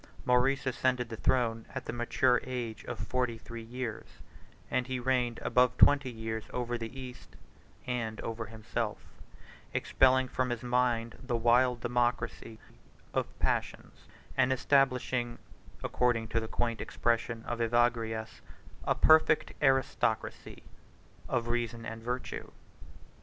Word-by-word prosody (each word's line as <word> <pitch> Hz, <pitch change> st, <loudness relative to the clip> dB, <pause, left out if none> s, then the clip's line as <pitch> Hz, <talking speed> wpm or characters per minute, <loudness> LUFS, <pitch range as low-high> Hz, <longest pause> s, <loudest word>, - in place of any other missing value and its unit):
Maurice 125 Hz, +3 st, +3 dB
ascended 125 Hz, -1 st, 0 dB
the 115 Hz, -, -5 dB
throne 115 Hz, -1 st, +1 dB
at -, -, -4 dB
the -, -, -4 dB
mature 120 Hz, +1 st, +2 dB
age 120 Hz, -3 st, -4 dB
of -, -, -5 dB
forty 125 Hz, -2 st, -1 dB
three 115 Hz, +1 st, -8 dB
years; 120 Hz, -1 st, -5 dB, 0.6 s
and 125 Hz, -1 st, 0 dB
he 130 Hz, -1 st, -2 dB
reigned 125 Hz, -2 st, +1 dB
above 125 Hz, -1 st, +3 dB
twenty 145 Hz, -2 st, +6 dB
years 110 Hz, -2 st, -4 dB
over 120 Hz, -1 st, -2 dB
the 115 Hz, +3 st, -6 dB
East 125 Hz, -1 st, -10 dB, 0.5 s
and 115 Hz, -3 st, -2 dB
over 115 Hz, -1 st, -4 dB
himself; 110 Hz, 0 st, -3 dB, 0.8 s
30 -, -, 0 dB
expelling 130 Hz, 0 st, +4 dB
from 130 Hz, 0 st, -1 dB
his 120 Hz, -1 st, -3 dB
mind 120 Hz, -2 st, 0 dB
the 125 Hz, -2 st, -2 dB
wild 120 Hz, +1 st, +3 dB
democracy 120 Hz, -2 st, -1 dB, 0.6 s
of -, -, -2 dB
passions, -, -, -2 dB, 0.3 s
and 130 Hz, -, +3 dB
establishing 130 Hz, -3 st, +2 dB, 0.5 s
(according 120 Hz, -2 st, +1 dB
to 115 Hz, -, +1 dB
the 110 Hz, -, -5 dB
quaint 115 Hz, 0 st, -1 dB
expression 115 Hz, -1 st, -1 dB
of 120 Hz, 0 st, -4 dB
Evagrius) 115 Hz, -1 st, 0 dB, 0.4 s
a -, -, +2 dB
perfect 160 Hz, 0 st, +5 dB
aristocracy 135 Hz, -5 st, 0 dB, 0.7 s
of 120 Hz, -1 st, 0 dB
reason 120 Hz, -1 st, -2 dB
and 115 Hz, 0 st, -6 dB
virtue. 125 Hz, +2 st, -4 dB
120 Hz, 130 wpm, -31 LUFS, 115-125 Hz, 0.8 s, twenty